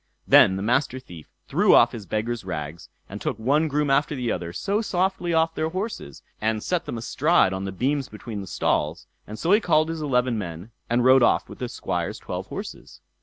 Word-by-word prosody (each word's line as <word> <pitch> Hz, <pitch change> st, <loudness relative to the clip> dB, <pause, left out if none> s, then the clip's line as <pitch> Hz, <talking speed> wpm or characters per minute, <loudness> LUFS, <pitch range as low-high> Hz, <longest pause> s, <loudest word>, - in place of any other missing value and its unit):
Then 95 Hz, -, +7 dB
the 95 Hz, -, -3 dB
Master 130 Hz, +3 st, +1 dB
Thief 85 Hz, -11 st, -13 dB, 0.2 s
threw -, -, +4 dB
off -, -, +6 dB
his 105 Hz, -5 st, -8 dB
beggar's 110 Hz, +4 st, -2 dB
rags, 85 Hz, -1 st, -6 dB, 0.2 s
and -, -, -8 dB
took -, -, -2 dB
one 140 Hz, +8 st, +2 dB
groom 150 Hz, -1 st, 0 dB
after 145 Hz, +2 st, +2 dB
the 125 Hz, -3 st, -2 dB
other 85 Hz, -1 st, -4 dB
so 205 Hz, -, -1 dB
softly 185 Hz, -3 st, -1 dB
off 165 Hz, 0 st, +2 dB
their 160 Hz, 0 st, -1 dB
horses, 185 Hz, -, -5 dB, 0.2 s
and 110 Hz, 0 st, -1 dB
set 180 Hz, -2 st, -1 dB
them -, -, -5 dB
astride 135 Hz, -, +2 dB
on 95 Hz, +1 st, -4 dB
the 95 Hz, -, -4 dB
beams 135 Hz, +7 st, -1 dB
between 105 Hz, -1 st, -7 dB
the 95 Hz, -, -8 dB
stalls; 75 Hz, -1 st, -1 dB, 0.2 s
and 105 Hz, -, -7 dB
so 165 Hz, -, -1 dB
he 210 Hz, -, +6 dB
called 155 Hz, -6 st, +2 dB
his 165 Hz, -1 st, -4 dB
eleven 125 Hz, -5 st, +1 dB
men, 90 Hz, +2 st, -7 dB, 0.2 s
and 120 Hz, +1 st, +2 dB
rode 130 Hz, 0 st, +6 dB
off -, -, +3 dB
with -, -, -12 dB
the -, -, -4 dB
Squire's -, -, -3 dB
twelve -, -, -6 dB
horses. -, -, -8 dB
125 Hz, 210 wpm, -24 LUFS, 100-155 Hz, 0.2 s, Then